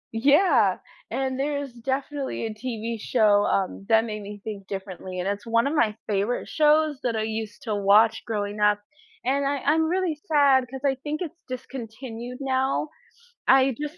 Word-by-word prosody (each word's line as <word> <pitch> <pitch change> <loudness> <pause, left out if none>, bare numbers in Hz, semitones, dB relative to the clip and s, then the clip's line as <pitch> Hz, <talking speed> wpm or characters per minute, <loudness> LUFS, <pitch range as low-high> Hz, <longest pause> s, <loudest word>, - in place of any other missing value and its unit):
Yeah. 290 +11 +4 0.3
And 265 -1 -2
there's 285 -2 -2
definitely 265 +2 -3
a 220 - -4
TV 230 0 -4
show, 210 -2 +3
um, 195 0 -1
that 225 0 +5
made 215 -2 -5
me 205 0 -9
think 200 -3 -7
differently, 190 -2 -6
and 180 - -2
it's 205 +2 -3
one 230 0 +2
of 290 - -1
my 220 -7 +2
favorite 205 +3 -1
shows 305 -1 +3
that 240 -2 0
I 220 - 0
used 220 -1 -5
to 220 -4 -2
watch 210 +3 +4
growing 205 -2 -3
up. 210 0 +4 0.5
And 275 +2 +1
I 285 +1 0
I'm 320 +1 +3
really 350 -3 0
sad 280 -4 +4
'cause 265 0 -7
I 270 - +3
think 305 +2 -3
it's 345 -1 -6
discontinued 245 -1 -7
now. 265 +2 0 0.6
I 265 -1 +5
just 300 +3 -5
240 Hz, 170 wpm, -25 LUFS, 215-280 Hz, 0.6 s, that